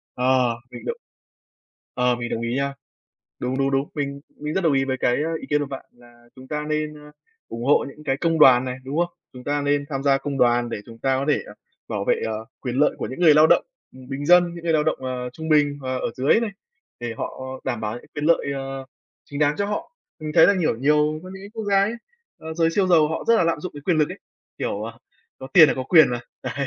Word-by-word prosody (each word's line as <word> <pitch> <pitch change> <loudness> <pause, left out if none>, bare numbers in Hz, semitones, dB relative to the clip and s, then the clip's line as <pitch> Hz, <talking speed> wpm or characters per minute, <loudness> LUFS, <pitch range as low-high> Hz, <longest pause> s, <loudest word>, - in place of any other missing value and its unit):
Ờ, 125 -2 +2
mình - - -10
động 470 - -3 1.0
ờ, 125 -1 +2
mình 120 0 -5
đồng 115 - -2
ý 115 +1 -2
nha. 140 0 -1 0.7
Đúng, 130 +2 -2
đúng, 135 0 +1
đúng, 135 +1 0
mình 140 -1 -3 0.2
mình 150 +1 -5
rất 190 - +1
đồng 165 -5 +2
ý 135 -1 +2
với 130 -1 -1
cái, 120 - +2
a, 165 +1 -2
ý - - -8
kiến 150 0 +3
của 145 - -2
bạn 135 -1 -7
là 120 0 -20
chúng 130 0 -13
ta 150 0 -3
nên, 155 0 -2
a, 150 0 -14 0.4
ủng 115 +1 -6
hộ 140 - +4
những 150 +2 -13
cái 135 - 0
công 165 +2 0
đoàn 130 -4 +7
này, 125 -1 -4
đúng 140 +4 -3
không? 175 0 +2 0.2
Chúng 125 -1 -11
ta 145 0 0
nên 145 0 +1
tham 135 -2 -3
gia 135 -1 +3
công 140 0 -4
đoàn 120 -1 +3
để 115 - -4
chúng 115 -1 -12
ta 135 +2 +1
có 135 - -1
thể - - +1 0.5
bảo - - -2
vệ, - - +1
ờ, 110 0 -4 0.2
quyền 125 -2 -4
lợi 150 +2 +4
của - - -3
những 130 - -7
người 160 -4 +7
lao 155 +1 +7
động, - - +4 0.3
ừm, 130 -1 -14
bình 140 +1 -4
dân, 175 0 +5
những 170 -1 -9
người 165 - +2
lao 155 -1 +3
động, 155 - 0
ờ, 125 -1 -4
trung 160 +5 -7
bình 145 -2 +3
và 130 -1 -3
ở 125 - -2
dưới 135 - +3
này, 230 -2 -2 0.5
để 120 -1 -4
họ - - -5 0.2
đảm 120 - -2
bảo 105 0 -3
những 120 - -11
quyền 150 -1 -3
lợi, 165 -1 +3
ờ, 135 0 -5 0.4
chính 140 - -7
đáng 150 0 +2
cho 200 - -1
họ. 210 - -4 0.3
Mình 155 0 -4
thấy - - +8
là, 200 - +4
kiểu, 155 -8 +1
nhiều 150 +4 +2
có 185 - -10
những 190 +1 -10
cái 200 - -10
quốc 220 -1 -4
gia 200 -1 +3
ấy, 205 +3 0 0.5
ờ, 160 0 -7
giới 165 0 +2
siêu 190 +3 +1
giàu 165 -4 +5
họ 160 - -3
rất 230 - +6
là 180 - +3
lạm 165 -2 0
dụng 180 - -6
cái 145 - -9
quyền 165 +3 +1
lực 150 - +3
ấy, - - -8 0.4
kiểu, 100 - -2
ờ, 115 +1 -7 0.4
có 130 - -8
tiền 165 -6 +9
là - - +1
có 130 - -3
quyền 155 +2 +6
mà, 120 0 -2 0.2
đấy, - - -3
145 Hz, 265 wpm, -23 LUFS, 130-160 Hz, 1.0 s, tiền